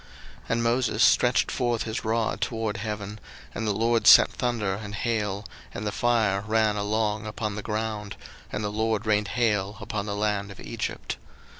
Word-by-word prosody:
02:009:023 - - -19
And 115 0 +1
Moses 120 +1 +2
stretched - - +4
forth 120 -2 0
his 110 -1 -4
rod 110 0 0
toward 115 -3 -1
heaven: 105 -1 -5 0.3
and 110 - -3
the - - +2
LORD 115 +2 +1
sent - - +9
thunder 115 -6 -1
and 105 +1 -6
hail, 105 -3 -1 0.3
and 105 - -4
the 105 - -1
fire 110 -4 +2
ran 110 -1 +2
along 105 +1 -1
upon 105 0 -3
the 105 - -4
ground; 105 -1 -3 0.4
and 105 - -3
the 105 - -2
LORD 110 0 0
rained 105 -1 +2
hail 105 -2 0
upon 105 -1 -4
the 100 - -2
land 105 -1 -1
of 100 - -11
Egypt. - - -4
110 Hz, 175 wpm, -26 LUFS, 105-115 Hz, 0.4 s, sent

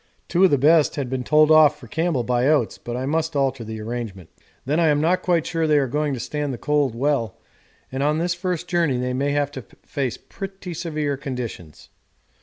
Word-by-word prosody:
Two 180 +2 +2
of 190 - +7
the 145 - +3
best 155 +3 +4
had 135 -4 -3
been 130 -1 -2
told 155 +3 +4
off 150 -1 +6
for - - -12
Campbell 160 -6 0
by 125 +2 +1
Oates, 145 -7 +1
but 120 0 -5
I 130 - -3
must 160 +2 -1
alter 135 -3 0
the 110 0 -6
arrangement. 110 -5 -6 0.3
'Then 150 +5 +1
I 165 - +4
am 145 -1 +3
not 170 +4 +2
quite 170 -3 +1
sure 165 -2 -1
they 150 -1 +4
are 140 - +3
going 145 +2 -1
to - - -6
stand 145 +4 -3
the 125 - -5
cold 145 -3 0
well, 130 -3 0 0.5
and 130 +1 -3
on 150 +2 +2
this 170 +2 0
first 180 -1 -3
journey 170 -7 +1
they 125 0 -2
may 140 +3 0
have 145 -1 0
to 135 - -7 0.2
face 135 -5 -3
pretty 195 -2 -8
severe 150 -4 -2
conditions. 120 - -7
145 Hz, 215 wpm, -22 LUFS, 125-160 Hz, 0.5 s, of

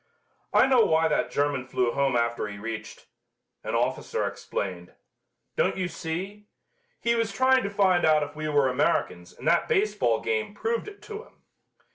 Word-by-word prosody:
"I - - +5
know 260 -3 +5
why 160 -2 +3
that 150 - 0
German 140 -3 -1
flew 125 -2 0
home 135 0 +1
after 115 -2 0
he 100 -1 -8
reached 110 +1 -7 0.3
," - - -55
an - - -3
officer - - -1
explained. 90 -3 -5 0.6
"Don't - - +1
you 185 -1 -1
see? 180 +5 -5 0.5
He 235 - +1
was 230 -1 0
trying 260 0 +4
to 200 - -2
find 195 -3 +3
out 155 -1 +4
if 145 0 -7
we 155 0 -3
were 145 -2 +3
Americans 90 -8 0
and - - -9
that - - +3
baseball 430 -2 +1
game 445 0 -2
proved 465 0 -2
it 410 -1 -11
to 430 0 -7
him." - - -25
160 Hz, 175 wpm, -26 LUFS, -, 0.6 s, I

